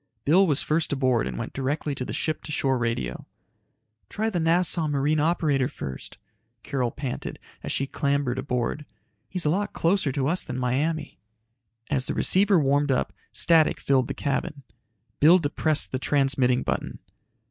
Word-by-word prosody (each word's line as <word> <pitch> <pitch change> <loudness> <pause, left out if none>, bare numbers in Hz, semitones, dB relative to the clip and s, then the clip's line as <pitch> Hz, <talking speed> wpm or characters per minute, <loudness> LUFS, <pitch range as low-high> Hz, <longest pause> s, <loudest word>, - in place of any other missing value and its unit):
Bill 185 +6 +5
was 145 -2 +1
first 160 +1 0
aboard 130 - +1
and 60 -2 -5
went - - -5
directly 145 +2 -2
to 130 - -4
the - - -5
ship 155 -1 -2
to - - -6
shore 135 -3 +1
radio. 115 - -3 0.8
"Try 220 +2 -1
the 180 - -1
Nassau 165 0 +1
marine 145 +1 +1
operator 150 -4 +1
first," 65 - -8 0.5
Carol 130 -4 -1
panted 135 0 -5 0.2
as - - -5
she 135 - 0
clambered 140 -2 -1
aboard. 130 +2 -2 0.4
"He's 180 -3 -3
a 150 - +3
lot 200 +4 -1
closer 170 -4 +1
to 135 0 -1
us 175 +4 +1
than 125 -3 -5
Miami." 145 +5 -1 0.7
As 135 -2 0
the - - -2
receiver 195 -1 +3
warmed 145 0 +2
up, 130 - 0 0.2
static 165 -2 +3
filled 130 -3 +2
the - - -4
cabin. 140 0 -2 0.6
Bill 165 +5 +7
depressed 155 -1 0
the 130 - -2
transmitting 135 -3 +2
button. - - -3
145 Hz, 160 wpm, -25 LUFS, 130-160 Hz, 0.8 s, Bill